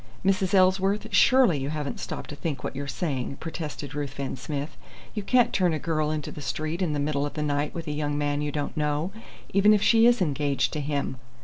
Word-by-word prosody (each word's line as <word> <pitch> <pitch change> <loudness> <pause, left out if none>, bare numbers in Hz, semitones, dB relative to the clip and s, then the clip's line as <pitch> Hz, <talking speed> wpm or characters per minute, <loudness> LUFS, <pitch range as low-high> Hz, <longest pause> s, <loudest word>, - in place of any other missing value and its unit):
"Mrs. 195 0 +2
Ellsworth, 190 +2 +3
surely 255 - +5
you 135 +1 -3
haven't 150 -2 -3
stopped - - -6
to - - -6
think 145 -3 -4
what - - -4
you're 140 +1 -4
saying!" 135 -3 -3
protested 155 -3 -6
Ruthven 140 -2 -4
Smith. 145 +3 -5 0.4
"You 210 - -2
can't 245 +4 +3
turn 180 -3 +2
a - - 0
girl 155 -1 0
into 155 -1 -3
the 150 - -8
street 155 +4 -3
in 170 -5 +1
the 145 - -1
middle 145 0 0
of 145 - -4
the 150 - -1
night 145 0 -1
with 165 -1 -4
a - - -1
young 145 0 -1
man 145 0 0
you 150 0 -1
don't 145 0 -3
know, 150 +3 0 0.4
even 205 +2 +6
if 205 - +1
she 230 0 +6
is 240 0 +4
engaged 145 -6 0
to 155 - -2
him." 140 -2 -2
150 Hz, 220 wpm, -26 LUFS, 145-180 Hz, 0.4 s, even